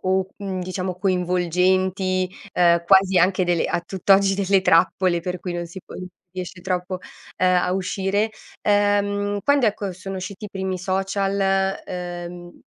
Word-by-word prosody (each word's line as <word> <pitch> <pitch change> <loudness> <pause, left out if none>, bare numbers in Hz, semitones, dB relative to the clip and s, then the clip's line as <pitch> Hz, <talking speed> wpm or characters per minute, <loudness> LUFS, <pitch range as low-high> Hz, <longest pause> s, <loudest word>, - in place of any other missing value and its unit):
o, 190 0 +1
uhm, 195 -2 -4
diciamo 185 0 -4
coinvolgenti, 185 0 +1 0.2
ehm, 170 -1 +4
quasi 190 0 +5
anche 185 +1 +3
delle 175 -1 +1
a - - -1
tutt'oggi 195 +1 +3
delle 195 -1 +2
trappole 175 0 +3
per 180 +1 -4
cui 180 - -5
non 175 0 -4
si 170 +3 -10
può - - -12
si 185 - -7 0.2
riesce 185 0 -7
troppo, 185 0 -2 0.4
ehm, 185 0 +3
a 180 0 +1
uscire. 195 +3 0 0.3
Ehm, 205 0 +1
quando, 285 -4 +4
ecco, 205 -2 -1
sono 190 +2 -7
usciti 190 +3 -6
i - - -11
primi 190 -1 -3
social, 195 +2 -1 0.5
ehm... 175 -1 -7
185 Hz, 150 wpm, -22 LUFS, 180-195 Hz, 0.5 s, quasi